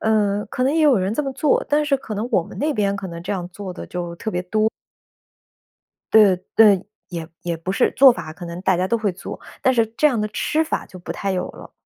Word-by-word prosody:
呃， 210 Hz, -2 st, +1 dB
可 255 Hz, +4 st, -2 dB
能 280 Hz, +4 st, +2 dB
也 325 Hz, -, +2 dB
有 290 Hz, -7 st, +5 dB
人 190 Hz, +3 st, -1 dB
这 300 Hz, -, 0 dB
么 270 Hz, -2 st, -3 dB
做， 280 Hz, +2 st, +1 dB
但 295 Hz, +1 st, +2 dB
是 280 Hz, -2 st, +2 dB
可 220 Hz, -5 st, -7 dB
能 220 Hz, +4 st, -3 dB
我 175 Hz, -, +4 dB
们 205 Hz, -, -11 dB
那 300 Hz, +1 st, 0 dB
边 200 Hz, -2 st, +1 dB
可 195 Hz, -1 st, -5 dB
能 170 Hz, -1 st, -7 dB
这 185 Hz, -, -3 dB
样 180 Hz, -3 st, -4 dB
做 190 Hz, 0 st, -7 dB
的 -, -, -8 dB
就 175 Hz, -1 st, -5 dB
特 220 Hz, -, -4 dB
别 180 Hz, 0 st, -1 dB
多。 215 Hz, +4 st, +1 dB, 1.4 s
对， 210 Hz, -4 st, +7 dB, 0.2 s
对， 205 Hz, -4 st, +5 dB, 0.2 s
也 165 Hz, -2 st, -6 dB
也 170 Hz, -1 st, -2 dB
不 175 Hz, +4 st, -4 dB
是， 195 Hz, -, +2 dB
做 270 Hz, -1 st, +8 dB
法 170 Hz, -8 st, -7 dB
可 175 Hz, +3 st, -10 dB
能 170 Hz, +1 st, -6 dB
大 190 Hz, -1 st, +3 dB
家 180 Hz, +1 st, 0 dB
都 235 Hz, -, +1 dB
会 215 Hz, -4 st, -1 dB
做， 175 Hz, -, -8 dB, 0.2 s
但 260 Hz, -, +4 dB
是 230 Hz, -2 st, +3 dB
这 305 Hz, -, +4 dB
样 245 Hz, -7 st, +1 dB
的 215 Hz, -, -1 dB
吃 310 Hz, +8 st, 0 dB
法 315 Hz, -, -3 dB
就 185 Hz, -, -12 dB
不 175 Hz, -, -6 dB
太 200 Hz, -1 st, -2 dB
有 180 Hz, -, -2 dB
了。 -, -, -13 dB
205 Hz, 275 characters per minute, -21 LUFS, 180-240 Hz, 1.4 s, 做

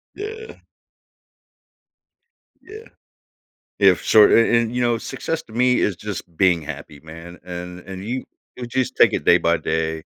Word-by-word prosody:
Yeah. 445 Hz, +2 st, -8 dB, 2.0 s
Yeah. 430 Hz, +4 st, -12 dB, 0.9 s
Yeah, 95 Hz, -2 st, +6 dB
for -, -, -12 dB
sure, 110 Hz, 0 st, +6 dB
and 115 Hz, +1 st, +3 dB
and, 115 Hz, 0 st, 0 dB
you 125 Hz, -, -1 dB
know, 120 Hz, -1 st, +1 dB
success 160 Hz, +7 st, -5 dB
to 110 Hz, -, -18 dB
me 125 Hz, +1 st, +2 dB
is 95 Hz, -4 st, 0 dB
just 105 Hz, -1 st, -6 dB
being 90 Hz, -3 st, +2 dB
happy, 75 Hz, 0 st, -9 dB
man, 80 Hz, +3 st, -12 dB
and 90 Hz, 0 st, -8 dB
and 95 Hz, +1 st, -9 dB
you 125 Hz, +5 st, -4 dB, 0.3 s
you 125 Hz, -, -6 dB
just 130 Hz, 0 st, -2 dB
take -, -, +5 dB
it -, -, -3 dB
day 85 Hz, -, +7 dB
by 85 Hz, -1 st, +1 dB
day, 80 Hz, 0 st, -2 dB
100 Hz, 160 wpm, -21 LUFS, 85-125 Hz, 2.0 s, day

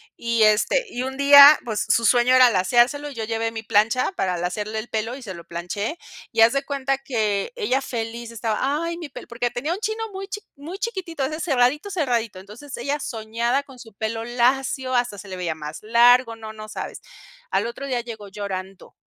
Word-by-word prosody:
Y 235 Hz, -1 st, +1 dB
este 215 Hz, -, +3 dB
y 245 Hz, -, -4 dB
un 265 Hz, +1 st, -5 dB
día 285 Hz, +1 st, +9 dB
pues 220 Hz, -3 st, -1 dB
su 230 Hz, -, +3 dB
sueño 245 Hz, +2 st, +4 dB
era 255 Hz, -1 st, +7 dB
laceárselo, 240 Hz, +9 st, +2 dB
y 280 Hz, -, -11 dB
yo 225 Hz, -, -4 dB
llevé 225 Hz, +1 st, -2 dB
mi 225 Hz, -1 st, -6 dB
plancha 225 Hz, -, +2 dB
para 185 Hz, -, -1 dB
lacearle 210 Hz, +5 st, -3 dB
el 220 Hz, -, -7 dB
pelo 225 Hz, +2 st, -2 dB
y 270 Hz, -, -10 dB
se 200 Hz, -5 st, -6 dB
lo 170 Hz, -2 st, -11 dB
planché, 180 Hz, -, -4 dB, 0.3 s
y 225 Hz, -, +2 dB
haz 225 Hz, +2 st, +6 dB
de 275 Hz, +1 st, 0 dB
cuenta 275 Hz, -1 st, -2 dB
que 215 Hz, -, -1 dB
ella 345 Hz, -, 0 dB
feliz 235 Hz, -1 st, -5 dB
estaba: 225 Hz, -1 st, -2 dB, 0.3 s
"Ay 335 Hz, 0 st, -3 dB
mi 325 Hz, -, -7 dB
pelo", -, -, -10 dB
porque 240 Hz, +1 st, -2 dB
tenía 285 Hz, +8 st, -3 dB
un 370 Hz, -, -5 dB
chino 440 Hz, +1 st, -2 dB
muy 385 Hz, +1 st, -6 dB
chi 415 Hz, +1 st, -6 dB
muy 315 Hz, +7 st, -8 dB
chiquitito, 380 Hz, -, -4 dB
de 310 Hz, +2 st, -5 dB
ese -, -, -4 dB
cerradito, 265 Hz, +8 st, +2 dB
cerradito, 240 Hz, -, -1 dB
entonces 215 Hz, +9 st, -10 dB
ella 280 Hz, +4 st, -2 dB
soñaba 235 Hz, +3 st, -2 dB
con 265 Hz, -3 st, -15 dB
su 225 Hz, -4 st, -13 dB
pelo 225 Hz, +2 st, -3 dB
lacio, 255 Hz, +2 st, 0 dB
hasta 245 Hz, -4 st, 0 dB
se 205 Hz, -, -10 dB
le 185 Hz, -1 st, -6 dB
veía 170 Hz, -3 st, -2 dB
más 150 Hz, 0 st, -7 dB
largo, 235 Hz, +2 st, +4 dB
no, 220 Hz, -1 st, -9 dB
no 215 Hz, 0 st, -9 dB
sabes. -, -, -6 dB, 0.5 s
Al -, -, 0 dB
otro 255 Hz, +4 st, -6 dB
día 250 Hz, -2 st, -1 dB
llegó 225 Hz, -3 st, -9 dB
llorando, 195 Hz, -1 st, -7 dB
235 Hz, 210 wpm, -23 LUFS, 215-275 Hz, 0.5 s, día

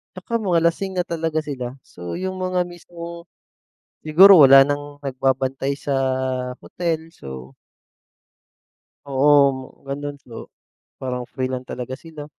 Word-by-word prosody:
Tsaka 230 Hz, +5 st, -3 dB
mga 180 Hz, -5 st, +2 dB
lasing 190 Hz, +2 st, -5 dB
na 180 Hz, -, +2 dB
talaga 160 Hz, -1 st, -1 dB
sila. 130 Hz, -3 st, -5 dB
So, 85 Hz, 0 st, -9 dB
yung 185 Hz, +1 st, -4 dB
mga 185 Hz, -1 st, 0 dB
mismong 170 Hz, 0 st, -10 dB, 0.8 s
siguro 185 Hz, +5 st, +8 dB
wala 135 Hz, 0 st, +9 dB
nang 145 Hz, +1 st, -3 dB
nagbabantay 135 Hz, +1 st, -1 dB
sa 140 Hz, -, -3 dB, 0.7 s
hotel. 165 Hz, -2 st, -3 dB
So 65 Hz, -1 st, -10 dB, 1.6 s
Oo, 140 Hz, -1 st, +2 dB
gano'n 145 Hz, +1 st, -5 dB
po. 115 Hz, -2 st, -10 dB, 0.5 s
Parang 125 Hz, -2 st, -5 dB
free 130 Hz, -, -4 dB
lang 130 Hz, 0 st, -5 dB
talaga 125 Hz, +1 st, -6 dB
sila. 155 Hz, -3 st, -10 dB
145 Hz, 120 wpm, -22 LUFS, 130-170 Hz, 1.6 s, wala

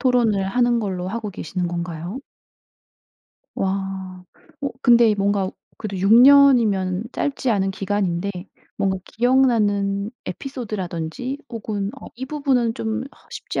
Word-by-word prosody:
토론을 235 Hz, -7 st, +2 dB
하는 240 Hz, +1 st, +2 dB
걸로 185 Hz, -3 st, -3 dB
하고 215 Hz, +1 st, -4 dB
계시는 175 Hz, 0 st, -3 dB
건가요? 170 Hz, +5 st, -4 dB, 1.4 s
와. 190 Hz, -1 st, -3 dB, 0.4 s
어 280 Hz, -, 0 dB
근데 235 Hz, -3 st, +5 dB
뭔가 200 Hz, -1 st, 0 dB, 0.3 s
그래도 200 Hz, -4 st, -5 dB
6 195 Hz, +3 st, +3 dB
년이면 235 Hz, -8 st, +6 dB
짧지 270 Hz, -3 st, -1 dB
않은 195 Hz, -3 st, +1 dB
기간인데 195 Hz, -1 st, -1 dB, 0.5 s
뭔가 190 Hz, -1 st, 0 dB
기억나는 215 Hz, -5 st, +2 dB
에피소드라든지 230 Hz, -, -5 dB
혹은 205 Hz, -3 st, -3 dB
'어 -, -, -10 dB
이 255 Hz, +2 st, -5 dB
부분은 265 Hz, -5 st, 0 dB
좀 220 Hz, +1 st, -2 dB
어 275 Hz, -, -14 dB
쉽지 -, -, -4 dB
205 Hz, 260 characters per minute, -22 LUFS, 190-245 Hz, 1.4 s, 년이면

